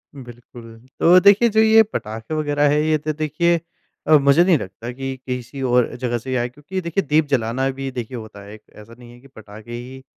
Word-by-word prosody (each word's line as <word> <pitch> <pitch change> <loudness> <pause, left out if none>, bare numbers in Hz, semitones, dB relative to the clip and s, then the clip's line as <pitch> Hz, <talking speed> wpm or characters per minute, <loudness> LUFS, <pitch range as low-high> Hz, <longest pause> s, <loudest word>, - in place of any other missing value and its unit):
बिल्कुल। 120 -2 -13 0.3
तो 180 +2 +6
देखिए, 205 +5 +5
जो 220 +1 +1
ये 220 0 +6
पटाखे 110 - -6
वगैरह 145 -1 +1
हैं, 150 +1 +2
ये 155 0 +1
तो, 155 +1 -4
देखिए 155 +3 0 0.5
अ, 155 - +6
मुझे 140 +4 +4
नहीं 180 -4 +3
लगता 110 +3 -8
कि 135 +1 -5
किसी 125 +2 -6
और 125 -1 +1
जगह 120 -1 -2
से 130 +3 -9
ही 130 - -1
आए 120 - +1
हैं, 120 - -4
क्योंकि 150 +8 -6
देखिए, 170 +3 -2
दीप 155 +1 +3
जलाना 125 +2 0
भी 135 0 -6
देखिए, 125 0 -6
होता 110 -2 -11
है 100 +1 -12
एक। 110 - -13
ऐसा 105 +2 -14
नहीं 120 -1 -14
है 120 - -16
कि 135 - -18
पटाखे 110 +2 -13
ही 130 +2 -9
130 Hz, 225 wpm, -20 LUFS, 120-155 Hz, 0.5 s, तो